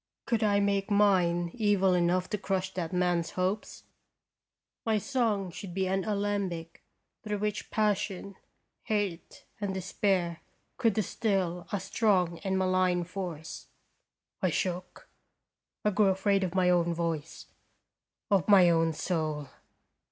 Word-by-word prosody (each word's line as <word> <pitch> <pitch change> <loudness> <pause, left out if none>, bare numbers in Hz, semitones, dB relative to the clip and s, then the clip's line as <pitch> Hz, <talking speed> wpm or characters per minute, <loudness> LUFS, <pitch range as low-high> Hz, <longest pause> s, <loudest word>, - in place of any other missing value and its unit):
Could 230 -2 0
I 205 -2 +3
make 200 0 +1
mine 180 -4 +3
evil 205 -5 +2
enough 180 +1 +2
to 210 - 0
crush 190 -1 -2
that 175 -2 -3
man's 175 -2 +1
hopes? 190 +4 -2 1.0
My 220 -1 +2
song 210 -5 0
should 180 0 -8
be 190 -1 +1
an 190 0 0
alembic 200 -5 -2 0.4
through 210 -2 -2
which 210 0 -3
passion, 200 -2 -1 0.5
hate, 205 -5 -3
and 200 -2 -2
despair 185 -2 0 0.4
could 230 -5 +2
distill 190 -4 -1
a 205 - 0
strong 185 -4 +1
and 190 -1 -1
malign 185 -1 +2
force. 175 -3 -6 0.7
I 185 - +2
shook. 180 +2 -3 0.8
I 210 - +4
grew 205 +1 +3
afraid 195 +1 +2
of 180 0 -3
my 180 -1 +4
own 170 -1 +2
voice, 165 -2 -3 0.9
of 195 -3 +3
my 185 -4 +7
own 165 -1 +2
soul. 155 -4 -2
190 Hz, 130 wpm, -29 LUFS, 175-205 Hz, 1.0 s, my